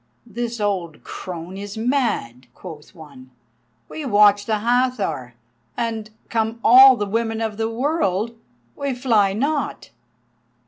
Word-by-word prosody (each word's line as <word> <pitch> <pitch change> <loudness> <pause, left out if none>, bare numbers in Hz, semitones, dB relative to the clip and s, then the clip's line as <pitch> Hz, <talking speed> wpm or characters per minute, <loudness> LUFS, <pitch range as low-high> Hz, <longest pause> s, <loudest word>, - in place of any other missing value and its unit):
"This 235 0 -5
old 185 -6 -2
crone 180 +1 -7
is 205 +1 -7
mad," 220 - -1
quoth 160 -1 -11
one. 140 -6 -14 0.6
"We 310 - -7
watch 205 -4 +4
the 220 -1 +1
Hathor, 225 - -1 0.4
and, 225 -2 -3 0.2
come 225 0 -1
all 260 +3 +9
the 210 - -2
women 225 +2 -2
of 220 -2 -3
the 225 0 -1
world, 230 - -1 0.4
we 280 -2 -3
fly 225 -6 +2
not." 280 - -2
220 Hz, 125 wpm, -21 LUFS, 195-240 Hz, 0.6 s, all